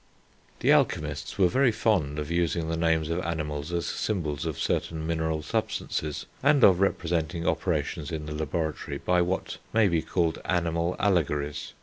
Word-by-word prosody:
The -, -, +4 dB
alchemists 75 Hz, +2 st, 0 dB
were 95 Hz, -3 st, +5 dB
very 130 Hz, +6 st, +3 dB
fond 105 Hz, -10 st, +1 dB
of 75 Hz, +1 st, -4 dB
using 85 Hz, -1 st, 0 dB
the 80 Hz, -, 0 dB
names 80 Hz, -1 st, +1 dB
of 85 Hz, -, 0 dB
animals 75 Hz, -2 st, -3 dB
as 85 Hz, -1 st, -1 dB
symbols 80 Hz, -7 st, -2 dB
of 80 Hz, -4 st, -3 dB
certain 80 Hz, -1 st, -1 dB
mineral 80 Hz, -1 st, -1 dB
substances, 75 Hz, 0 st, -2 dB, 0.2 s
and 140 Hz, 0 st, +4 dB
of 90 Hz, -2 st, +7 dB
representing 85 Hz, -3 st, 0 dB
operations 75 Hz, -1 st, -1 dB
in 80 Hz, -2 st, -4 dB
the 75 Hz, -, -5 dB
laboratory 80 Hz, +1 st, -3 dB
by 90 Hz, -1 st, +2 dB
what 90 Hz, +2 st, -2 dB
may 110 Hz, -1 st, +5 dB
be 85 Hz, -3 st, +1 dB
called 85 Hz, -2 st, 0 dB
animal 85 Hz, 0 st, 0 dB
allegories. 75 Hz, -6 st, 0 dB
80 Hz, 155 wpm, -27 LUFS, 75-90 Hz, 0.2 s, of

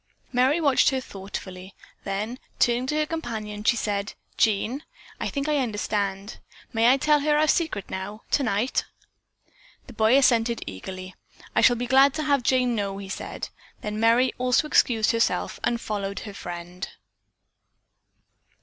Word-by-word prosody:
Merry 260 Hz, +6 st, +3 dB
watched 285 Hz, -5 st, +4 dB
her 265 Hz, -2 st, -1 dB
thoughtfully, 190 Hz, -4 st, -8 dB, 0.3 s
then 210 Hz, +6 st, -3 dB, 0.2 s
turning 240 Hz, +1 st, +2 dB
to 300 Hz, -, -1 dB
her 305 Hz, 0 st, +2 dB
companion, 220 Hz, -10 st, -5 dB
she 240 Hz, -, +4 dB
said, 205 Hz, -3 st, -2 dB, 0.2 s
"Jean, 225 Hz, +6 st, +1 dB, 0.4 s
I -, -, -2 dB
think 280 Hz, 0 st, -3 dB
I 300 Hz, -1 st, +2 dB
understand. 205 Hz, -4 st, -2 dB, 0.3 s
May 230 Hz, +2 st, +5 dB
I 265 Hz, -, +4 dB
tell 300 Hz, +2 st, +3 dB
her 295 Hz, +1 st, +2 dB
our 310 Hz, +1 st, +3 dB
secret 310 Hz, -, 0 dB
now 200 Hz, +3 st, -6 dB
tonight?" 235 Hz, -2 st, +1 dB, 1.0 s
The 250 Hz, -, -12 dB
boy 220 Hz, +4 st, +4 dB
assented 235 Hz, -3 st, +3 dB
eagerly. 185 Hz, -, -7 dB, 0.4 s
"I -, -, +4 dB
shall 245 Hz, -, +6 dB
be 245 Hz, +1 st, -3 dB
glad 270 Hz, +2 st, +5 dB
to 310 Hz, -, -2 dB
have 285 Hz, -3 st, +2 dB
Jane 250 Hz, 0 st, +2 dB
know," 200 Hz, -3 st, -2 dB
he 195 Hz, -1 st, -8 dB
said. -, -, -5 dB, 0.3 s
Then 210 Hz, 0 st, -4 dB
Merry 235 Hz, +3 st, +4 dB
also 255 Hz, +4 st, +2 dB
excused 225 Hz, -7 st, +3 dB
herself 230 Hz, 0 st, 0 dB
and 235 Hz, -1 st, +1 dB
followed 200 Hz, -3 st, -4 dB
her 205 Hz, -, -8 dB
friend. 175 Hz, 0 st, -7 dB
230 Hz, 150 wpm, -25 LUFS, 200-265 Hz, 1.0 s, shall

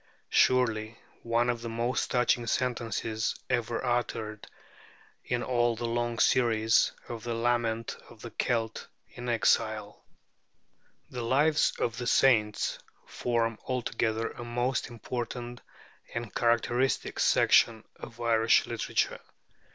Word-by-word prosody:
'" -, -, -46 dB, 0.2 s
Surely 115 Hz, -3 st, 0 dB, 0.2 s
one 115 Hz, +1 st, +1 dB
of 120 Hz, -1 st, -1 dB
the 115 Hz, -, -5 dB
most 120 Hz, +2 st, -1 dB
touching 120 Hz, -1 st, +1 dB
sentences 115 Hz, -2 st, -1 dB, 0.2 s
ever 120 Hz, 0 st, -1 dB
uttered 110 Hz, -3 st, -2 dB, 0.8 s
in 120 Hz, -1 st, -2 dB
all 120 Hz, -2 st, +1 dB
the 120 Hz, +1 st, -4 dB
long 120 Hz, 0 st, -1 dB
series 115 Hz, -3 st, +3 dB, 0.2 s
of 115 Hz, -3 st, -7 dB
the 120 Hz, -1 st, -3 dB
lament 115 Hz, -1 st, 0 dB
of 115 Hz, -, -15 dB
the 120 Hz, -, -7 dB
Celt 115 Hz, 0 st, -2 dB, 0.2 s
in 125 Hz, 0 st, -7 dB
exile! 110 Hz, -2 st, +1 dB, 1.1 s
The 125 Hz, -, -4 dB
Lives 145 Hz, +6 st, +3 dB
of 115 Hz, -1 st, -1 dB
the 120 Hz, -, -3 dB
Saints 110 Hz, -6 st, +3 dB, 0.3 s
form 115 Hz, -2 st, -1 dB
altogether 115 Hz, -3 st, -1 dB
a 120 Hz, -, -8 dB
most 120 Hz, +2 st, -1 dB
important 120 Hz, +1 st, -5 dB, 0.5 s
and 120 Hz, -2 st, -4 dB
characteristic 120 Hz, +2 st, +1 dB
section 115 Hz, -2 st, +4 dB
of 115 Hz, -, -11 dB
Irish 115 Hz, -1 st, +3 dB
literature. -, -, -1 dB
120 Hz, 120 wpm, -29 LUFS, 115-120 Hz, 1.1 s, section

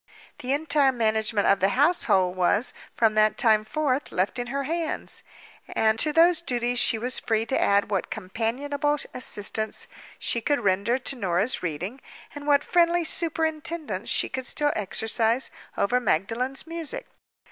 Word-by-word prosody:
The 255 Hz, -, -4 dB
entire 285 Hz, -1 st, +3 dB
management 220 Hz, -3 st, 0 dB
of 200 Hz, -, +4 dB
the 190 Hz, +1 st, +3 dB
household 195 Hz, -, +3 dB
was, 195 Hz, +6 st, +1 dB, 0.2 s
from 225 Hz, -2 st, +3 dB
that 215 Hz, 0 st, +3 dB
time 215 Hz, -2 st, +4 dB
forth, 280 Hz, +3 st, -1 dB
left 190 Hz, +7 st, -1 dB
in 245 Hz, -, -3 dB
her 275 Hz, +2 st, -2 dB
hands; 325 Hz, +2 st, -2 dB, 0.5 s
and 220 Hz, 0 st, +2 dB
to 305 Hz, -, +2 dB
those 335 Hz, +1 st, +4 dB
duties 245 Hz, -5 st, 0 dB
she 230 Hz, -, +3 dB
was 250 Hz, +3 st, -2 dB
free 225 Hz, -1 st, 0 dB
to 265 Hz, -, 0 dB
add 200 Hz, +1 st, +2 dB
what 195 Hz, -, -1 dB
companionable 275 Hz, +9 st, -2 dB, 0.2 s
assistance 215 Hz, -2 st, -2 dB, 0.3 s
she 235 Hz, -, -1 dB
could 285 Hz, +2 st, 0 dB
render 200 Hz, +4 st, +1 dB
to 265 Hz, +1 st, -2 dB
Norah's 195 Hz, +1 st, +1 dB
reading, 180 Hz, -, -4 dB, 0.3 s
and 290 Hz, 0 st, -9 dB
what 285 Hz, 0 st, +4 dB
friendly 345 Hz, 0 st, +2 dB
superintendence 320 Hz, 0 st, -2 dB
she -, -, +2 dB
could 260 Hz, -1 st, -4 dB
still 295 Hz, 0 st, +1 dB
exercise 225 Hz, +4 st, +1 dB, 0.3 s
over 245 Hz, +5 st, +2 dB
Magdalen's 245 Hz, -, -1 dB
music. 330 Hz, -3 st, -4 dB
245 Hz, 150 wpm, -25 LUFS, 215-290 Hz, 0.5 s, of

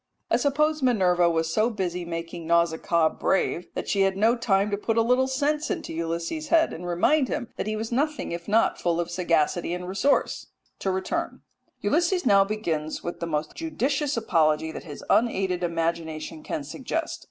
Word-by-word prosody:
I -, -, +5 dB
suppose 300 Hz, +2 st, +1 dB
Minerva 180 Hz, -9 st, +3 dB
was 165 Hz, -1 st, 0 dB
so 220 Hz, +2 st, +3 dB
busy 180 Hz, -5 st, -3 dB
making 165 Hz, 0 st, -6 dB
Nausicaa 170 Hz, -1 st, +2 dB
brave 180 Hz, -1 st, 0 dB
that -, -, -4 dB
she 200 Hz, -, +1 dB
had 195 Hz, 0 st, +2 dB
no 225 Hz, +4 st, +4 dB
time 205 Hz, -3 st, +1 dB
to -, -, +2 dB
put 225 Hz, +2 st, -1 dB
a 230 Hz, -, +5 dB
little 250 Hz, +3 st, +3 dB
sense 290 Hz, +3 st, 0 dB
into -, -, -3 dB
Ulysses' 170 Hz, -, -3 dB
head, 325 Hz, 0 st, +3 dB
and 175 Hz, +2 st, -7 dB
remind 255 Hz, -, +2 dB
him 240 Hz, -, -3 dB
that -, -, -4 dB
he 215 Hz, -, -1 dB
was 220 Hz, +2 st, -4 dB
nothing 295 Hz, +5 st, -1 dB
if 170 Hz, 0 st, -5 dB
not 220 Hz, +2 st, +2 dB
full 170 Hz, -1 st, +1 dB
of 175 Hz, 0 st, -2 dB
sagacity 175 Hz, -1 st, +1 dB
and 180 Hz, 0 st, -6 dB
resource. 195 Hz, +10 st, +1 dB, 0.3 s
To 195 Hz, -, -1 dB
return 190 Hz, 0 st, -2 dB, 0.4 s
Ulysses 350 Hz, -1 st, +1 dB
now 200 Hz, -4 st, +6 dB
begins 170 Hz, -7 st, -3 dB
with 175 Hz, -, -5 dB
the 170 Hz, -, -3 dB
most 155 Hz, -1 st, -2 dB
judicious 290 Hz, -3 st, -1 dB
apology 160 Hz, -7 st, +2 dB
that -, -, -8 dB
his 145 Hz, -3 st, -9 dB
unaided 190 Hz, -6 st, +2 dB
imagination 165 Hz, -2 st, -2 dB
can 150 Hz, -, -4 dB
suggest. 265 Hz, -, -4 dB
190 Hz, 180 wpm, -26 LUFS, 170-245 Hz, 0.4 s, now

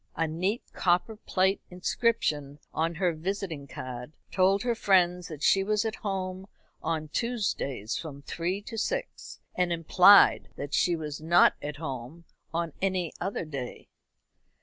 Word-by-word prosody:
A 165 Hz, -, 0 dB
neat 185 Hz, +8 st, -1 dB
copper 180 Hz, +5 st, +1 dB
plate 190 Hz, -2 st, +1 dB
inscription 180 Hz, -, 0 dB, 0.2 s
on 165 Hz, +1 st, 0 dB
her 175 Hz, 0 st, +1 dB
visiting 165 Hz, -3 st, -4 dB
card 125 Hz, +2 st, -7 dB, 0.2 s
told 195 Hz, +1 st, +3 dB
her 245 Hz, -1 st, +1 dB
friends 180 Hz, -5 st, +2 dB
that 155 Hz, -2 st, -8 dB
she 195 Hz, -, +4 dB
was 210 Hz, +2 st, +1 dB
at 220 Hz, 0 st, -2 dB
home 190 Hz, -1 st, -4 dB, 0.3 s
on 155 Hz, -2 st, -2 dB
Tuesdays 190 Hz, -, -2 dB
from 140 Hz, -3 st, -8 dB
three 180 Hz, +6 st, -3 dB
to 225 Hz, +1 st, -5 dB
six, -, -, -4 dB
and 180 Hz, -1 st, 0 dB
implied 180 Hz, +4 st, +6 dB
that 145 Hz, 0 st, -6 dB
she 175 Hz, -, +3 dB
was 150 Hz, -2 st, -5 dB
not 170 Hz, +2 st, +5 dB
at 145 Hz, 0 st, -4 dB
home 145 Hz, +2 st, -7 dB, 0.3 s
on 165 Hz, -2 st, -2 dB
any 185 Hz, -3 st, 0 dB
other 195 Hz, -3 st, -2 dB
day. 135 Hz, -5 st, -7 dB
175 Hz, 145 wpm, -28 LUFS, 155-195 Hz, 0.3 s, implied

